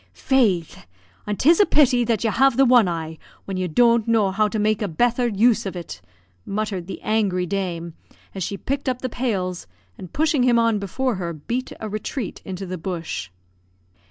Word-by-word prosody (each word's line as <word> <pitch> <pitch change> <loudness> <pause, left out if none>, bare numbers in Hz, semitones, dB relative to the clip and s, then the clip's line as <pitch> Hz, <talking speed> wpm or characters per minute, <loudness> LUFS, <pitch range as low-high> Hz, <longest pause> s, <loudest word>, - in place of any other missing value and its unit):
"Faix! 210 - +1 0.5
an' 210 - -1
'tis 325 +5 +4
a 410 - +7
pity 260 -5 +4
that 230 -2 0
you 225 - +1
have 265 +2 +3
the 270 - +6
one 245 -5 +5
eye, 160 -2 -4 0.3
when 195 - -4
you 185 0 -1
don't 235 +6 +3
know 220 -4 +2
how 210 +2 +2
to 215 - -3
make 215 0 +1
a 210 - 0
betther 240 +8 +1
use 230 +2 +3
of 190 - -5
it," 165 - -7 0.4
muttered 200 -3 -3
the - - -6
angry 200 -5 +1
dame, 175 -3 -3 0.4
as 195 - -6
she 200 +3 -3
picked 275 +3 -2
up 255 0 -3
the 255 - -1
pails, 195 - -3 0.3
and, 180 - -9
pushing 310 -2 +1
him 245 -1 +4
on 230 -2 +2
before 225 +4 -2
her, 170 -2 -4
beat 235 - -4
a 220 - -5
retreat 215 +2 -5
into 190 0 -6
the 185 -1 -5
bush. 165 - -4
215 Hz, 190 wpm, -22 LUFS, 185-245 Hz, 0.5 s, a